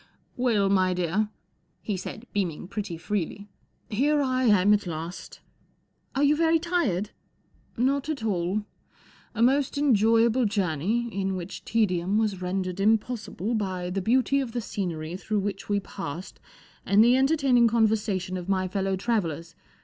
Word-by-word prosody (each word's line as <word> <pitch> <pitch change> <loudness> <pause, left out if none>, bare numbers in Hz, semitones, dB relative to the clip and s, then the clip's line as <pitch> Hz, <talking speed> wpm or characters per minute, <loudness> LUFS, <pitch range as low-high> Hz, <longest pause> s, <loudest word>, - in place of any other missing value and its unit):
" - - -42
Well, 210 -5 +3
my 185 -2 +2
dear," 180 +5 0 0.5
he 210 - -3
said, 205 +5 -7
beaming 175 -5 -2
pretty 200 -4 -5
freely, 200 +3 -3 0.2
" - - -45 0.2
here 290 +8 +1
I 260 -2 +1
am 205 -2 +5
at 205 -2 0
last." 165 +2 -7 0.4
" - - -43
Are 275 - +2
you 290 +1 +4
very 330 +1 +3
tired? 310 - -1 0.2
" - - -41
" - - -38
Not 275 +4 +1
at 285 -7 -3
all. 195 0 0 0.7
A 230 - +2
most 275 +3 +2
enjoyable 230 -2 +3
journey, 200 +3 0
in 195 0 -1
which 180 +1 -7
tedium 195 -3 +1
was 210 -4 0
rendered 185 0 -2
impossible 220 0 0
by 185 -5 -2
the 195 +1 -1
beauty 255 +6 +2
of 255 -4 -3
the 245 - -1
scenery 170 -6 -4
through 210 +1 -1
which 195 0 -4
we 205 0 +2
passed 190 -2 -7 0.4
and 200 +3 +5
the 240 +2 +5
entertaining 265 -3 +4
conversation 210 -5 +1
of 180 +1 -7
my 185 -1 +1
fellow 195 +1 -1
travellers. 185 -6 -2
205 Hz, 160 wpm, -26 LUFS, 185-235 Hz, 0.7 s, am